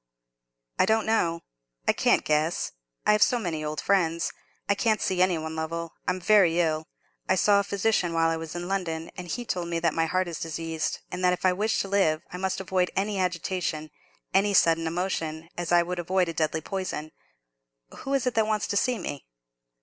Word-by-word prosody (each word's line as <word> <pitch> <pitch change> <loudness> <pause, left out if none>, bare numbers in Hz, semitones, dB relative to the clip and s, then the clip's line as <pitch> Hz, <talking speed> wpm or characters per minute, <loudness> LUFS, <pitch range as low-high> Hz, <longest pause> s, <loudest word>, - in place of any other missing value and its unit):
"I - - +4
don't 220 0 +2
know, 170 -7 +1 0.5
I - - +5
can't - - +2
guess—I've 150 - 0
so 245 - +5
many 170 -8 -3
old 150 0 -3
friends. 170 -4 +1 0.3
I 200 - +4
can't 215 +1 +1
see 185 -1 0
any 185 -2 +3
one, 160 0 -5
Lovell. 165 +1 -4
I'm 180 0 0
very 180 -3 +4
ill, 155 -2 0 0.4
I 185 - +5
saw 200 +1 +4
a - - +1
physician 200 -2 +1
while 165 0 +2
I - - 0
was 160 0 -6
in 175 0 -4
London; 165 -4 -2
and 180 -2 -7
he 240 +7 -4
told 180 -5 -2
me 170 0 -1
that 165 -2 +1
my 165 0 +1
heart 185 +2 0
is 170 -2 -5
diseased, 165 0 -3
and 180 +1 -4
that 180 0 +4
if 180 - -3
I 185 - +5
wish 210 +3 0
to - - -4
live 190 -6 +2
I - - -4
must 190 0 -1
avoid 185 -1 0
any 200 0 0
agitation, 175 -3 -2 0.4
any 200 +1 +3
sudden 165 -2 +4
emotion, 165 -2 -3
as 175 -1 -3
I 175 0 +6
would 180 +1 -4
avoid 180 +1 +1
a - - -3
deadly 160 0 0
poison. 175 -4 -4 0.9
Who 275 +1 -1
is 270 - 0
it 250 - +1
that 220 -2 +2
wants 215 -1 0
to 205 - +1
see 250 +3 +2
me?" 145 -9 -6
175 Hz, 205 wpm, -27 LUFS, 165-195 Hz, 0.9 s, I